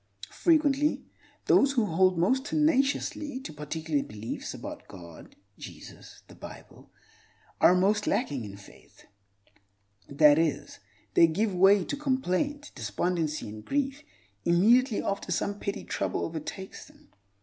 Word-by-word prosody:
Frequently, 300 -3 +2 0.4
those 275 0 +4
who 240 -5 +2
hold 185 0 +2
most 255 +11 +1
tenaciously 290 -1 0
to 265 - -8
particular 150 0 -3
beliefs 105 -1 -6
about - - -8
God, 85 -3 -13 0.2
Jesus, - - -12
and - - -37
the - - -24
Bible - - -12 0.7
are 180 - +6
most 205 +3 +2
lacking 145 - -1
in 100 -1 -9
faith—that 100 +8 -3
is, 145 -3 -2 0.3
they 165 - +6
give 200 +6 -1
way 195 +1 +5
to - - -3
complaint, 280 +1 -1
despondency, 165 -6 -2
and 105 0 -9
grief 280 0 -2 0.4
immediately 225 +7 +3
after 200 - -3
some 205 0 -2
petty 200 - -4
trouble - - -2
overtakes 165 +4 -7
them. - - -22
185 Hz, 125 wpm, -28 LUFS, -, 0.7 s, are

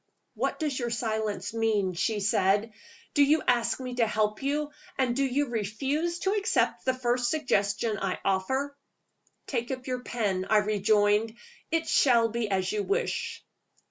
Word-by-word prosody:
"What - - -1
does 295 -5 -2
your 240 -1 -2
silence 220 -3 -2
mean?" 215 -5 +1
she 205 +4 -1
said. 200 +2 +2 0.4
"Do 290 - +3
you 305 +2 +3
ask 240 0 +2
me 255 -1 -5
to 230 -2 +3
help 215 -1 0
you, 295 +2 -1 0.3
and 255 -3 +1
do 275 - +1
you 275 +1 0
refuse 270 - -1
to 385 - +1
accept 420 +1 +1
the 260 - +3
first 245 -1 0
suggestion 215 -7 0
I 190 -2 -1
offer?" 265 +10 0 0.7
"Take 240 -3 -2
up 255 -1 -4
your 255 -1 -2
pen," 200 -7 -2
I 215 - +5
rejoined. 210 +1 +2 0.3
"It 330 0 0
shall 235 -4 +4
be 225 -1 -2
as 190 -1 0
you 210 - 0
wish." 475 - -2
230 Hz, 160 wpm, -28 LUFS, 210-270 Hz, 0.7 s, I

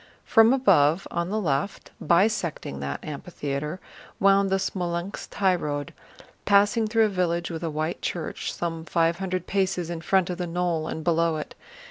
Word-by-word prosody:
From 225 +1 +6
above 175 - +3
on 170 +1 -2
the 215 +2 -1
left, 150 0 -2
bisecting 170 - +1
that 70 0 -5
amphitheater, 150 +1 -4 0.4
wound 195 0 +4
the 190 - +2
Smolénsk 180 -1 -3
highroad, 160 -8 0 0.5
passing 205 +2 +3
through 225 0 +3
a - - +1
village 175 -3 -1
with 165 -1 -5
a 165 - -1
white 155 +2 -3
church 170 -3 -3
some 165 -1 -4
five 165 +1 +1
hundred 185 -2 -2
paces 190 -3 -1
in 165 -1 -5
front 185 +1 +2
of 180 - -5
the 175 - -2
knoll 170 -2 -1
and 160 - -5
below 165 -1 +2
it. 155 - -6
175 Hz, 160 wpm, -25 LUFS, 160-195 Hz, 0.5 s, From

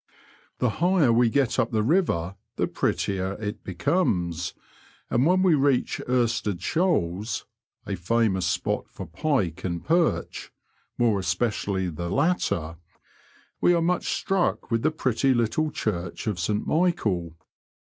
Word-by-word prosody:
The 125 - +1
higher 175 -9 +4
we 120 0 +4
get 135 0 +1
up 120 -2 +2
the 110 -2 0
river, 105 - +1 0.2
the - - +1
prettier 95 -1 -1
it 105 +1 -5
becomes, 90 - -1 0.6
and 125 +5 +3
when 185 +1 +3
we 185 -3 +5
reach 140 -3 +1
Irstead 115 -6 0
Shoals 110 - 0 0.4
(a - - -3
famous 95 -1 +1
spot 85 - -1
for - - -8
pike 95 - -1
and 85 -2 -3
.perch 165 0 0 0.2
— - - -42
more 115 -4 +2
especially 95 +1 -1
the 85 +1 -5
latter) 100 - 0 0.8
we 175 - +5
are - - +2
much 180 +1 0
struck 190 -8 -1
with 115 0 +1
the 155 - +3
pretty 135 -4 +1
little 120 +7 +1
church 90 -10 -3
of 105 -6 -2
St 105 +5 -1
Michael. 110 - 0
115 Hz, 140 wpm, -25 LUFS, 95-150 Hz, 0.8 s, we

